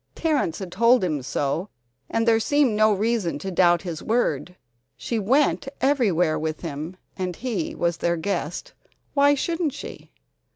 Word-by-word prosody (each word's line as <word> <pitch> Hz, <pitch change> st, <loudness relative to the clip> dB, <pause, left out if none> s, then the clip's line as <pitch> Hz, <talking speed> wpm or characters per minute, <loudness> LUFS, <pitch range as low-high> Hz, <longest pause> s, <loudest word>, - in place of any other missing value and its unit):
Terrence 295 Hz, -, 0 dB
had 190 Hz, -3 st, -7 dB
told 235 Hz, +2 st, +4 dB
him 155 Hz, -6 st, -1 dB
so, 145 Hz, +8 st, -2 dB, 0.4 s
and 225 Hz, +1 st, 0 dB
there 225 Hz, -1 st, +5 dB
seemed 275 Hz, -1 st, +2 dB
no 215 Hz, 0 st, +4 dB
reason 205 Hz, -6 st, 0 dB
to 190 Hz, +6 st, -5 dB
doubt 175 Hz, -1 st, +3 dB
his 170 Hz, -4 st, -5 dB
word. 180 Hz, -, 0 dB, 0.4 s
She 230 Hz, -, -2 dB
went 270 Hz, +6 st, +2 dB
everywhere 190 Hz, -, +2 dB
with 155 Hz, 0 st, -3 dB
him, 160 Hz, +2 st, -6 dB, 0.2 s
and 180 Hz, -2 st, -3 dB
he 220 Hz, -8 st, -3 dB
was 170 Hz, -1 st, 0 dB
their 170 Hz, 0 st, 0 dB
guest; 175 Hz, -1 st, -3 dB, 0.4 s
why 285 Hz, 0 st, +5 dB
shouldn't 330 Hz, 0 st, -1 dB
she? -, -, -9 dB
190 Hz, 155 wpm, -24 LUFS, 170-240 Hz, 0.4 s, there